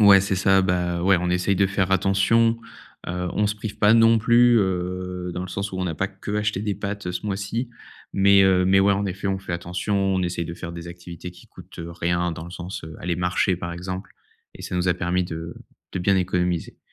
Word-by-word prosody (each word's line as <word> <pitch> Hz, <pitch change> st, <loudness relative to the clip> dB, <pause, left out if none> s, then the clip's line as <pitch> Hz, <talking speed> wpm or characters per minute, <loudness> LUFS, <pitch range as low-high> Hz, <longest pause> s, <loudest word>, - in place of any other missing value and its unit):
Ouais, 100 Hz, -2 st, +8 dB
c'est 95 Hz, 0 st, -1 dB
ça. 95 Hz, 0 st, +4 dB
Bah, 90 Hz, -2 st, 0 dB
ouais, 95 Hz, +1 st, +5 dB
on 90 Hz, 0 st, -1 dB
essaye 90 Hz, +2 st, +1 dB
de 100 Hz, -, +3 dB
faire 95 Hz, -1 st, -1 dB
attention. 100 Hz, +5 st, +3 dB, 0.5 s
Heu, 90 Hz, 0 st, -2 dB
on 105 Hz, -, +1 dB
se 105 Hz, -, -1 dB
prive 105 Hz, -1 st, -6 dB
pas 105 Hz, +2 st, +5 dB
non 115 Hz, 0 st, +6 dB
plus, 120 Hz, +1 st, +5 dB
heu, 90 Hz, -1 st, -2 dB
dans 90 Hz, -, -3 dB
le 95 Hz, -, -6 dB
sens 100 Hz, +2 st, -4 dB
où 95 Hz, -, -4 dB
on 90 Hz, -, -1 dB
a 80 Hz, -, -2 dB
pas -, -, -1 dB
que -, -, -9 dB
acheté 105 Hz, -2 st, 0 dB
des 105 Hz, -2 st, -1 dB
pâtes, 100 Hz, 0 st, -5 dB
heu, 90 Hz, -, -2 dB
ce 90 Hz, -, -4 dB
mois-ci. 105 Hz, +5 st, -2 dB, 0.4 s
Mais 100 Hz, 0 st, +5 dB
heu 95 Hz, -1 st, +4 dB
mais 95 Hz, +1 st, +4 dB
ouais, 100 Hz, +1 st, +4 dB
en 100 Hz, +1 st, 0 dB
effet, 95 Hz, +1 st, -4 dB
on 95 Hz, 0 st, 0 dB
fait 95 Hz, -2 st, -6 dB
attention. 90 Hz, +4 st, -2 dB
On 95 Hz, -1 st, +1 dB
essaye 85 Hz, -1 st, -2 dB
de 85 Hz, +1 st, -6 dB
faire 85 Hz, 0 st, -7 dB
des 85 Hz, 0 st, -8 dB
activités 85 Hz, 0 st, -9 dB
qui 90 Hz, -, -17 dB
coûtent, -, -, -15 dB
heu, 85 Hz, 0 st, -6 dB
rien, 85 Hz, +1 st, -1 dB
dans 80 Hz, 0 st, -7 dB
le 85 Hz, -, -10 dB
sens, 90 Hz, 0 st, -7 dB
heu, 80 Hz, 0 st, -9 dB
aller 85 Hz, -1 st, -2 dB
marcher, 90 Hz, +1 st, +1 dB
par 85 Hz, 0 st, -5 dB
exemple 95 Hz, +2 st, -6 dB, 0.4 s
et -, -, -12 dB
ça -, -, -6 dB
nous 90 Hz, +1 st, 0 dB
a -, -, +5 dB
permis 90 Hz, +1 st, 0 dB
de 80 Hz, 0 st, -6 dB, 0.4 s
de -, -, -2 dB
bien 100 Hz, +2 st, +2 dB
économiser. 90 Hz, -2 st, -1 dB
95 Hz, 240 wpm, -23 LUFS, 90-100 Hz, 0.5 s, Ouais